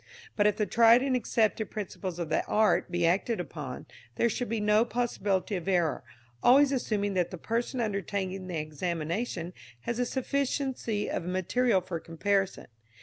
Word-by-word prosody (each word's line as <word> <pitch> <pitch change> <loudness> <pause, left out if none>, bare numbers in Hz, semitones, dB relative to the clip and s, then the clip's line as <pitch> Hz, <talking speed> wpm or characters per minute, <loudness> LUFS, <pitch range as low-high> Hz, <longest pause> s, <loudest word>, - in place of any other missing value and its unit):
But 205 -1 +4
if 210 - +1
the 210 - +1
tried 230 +4 +6
and 270 -2 +1
accepted 220 -2 +1
principles 190 -3 -5
of 170 -3 -4
the 155 - +1
art 215 -3 +2
be 175 -1 0
acted 195 +6 +1
upon, 150 -7 -6 0.3
there 235 - +2
should 245 +2 -3
be 230 0 -1
no 210 +1 +4
possibility 210 -5 -1
of 180 0 -5
error, 175 -5 +1 0.4
always 275 +3 +6
assuming 210 -6 -1
that 180 -2 +1
the 180 - -7
person 235 +7 -2
undertaking 195 -3 -2
the 175 -3 -3
examination 170 +4 -3 0.3
has 235 - -3
a 245 - +2
sufficiency 265 -5 -1
of 170 - -3
material 185 +4 +1
for 175 -2 -5
comparison. 190 +4 -1
205 Hz, 160 wpm, -29 LUFS, 180-235 Hz, 0.4 s, tried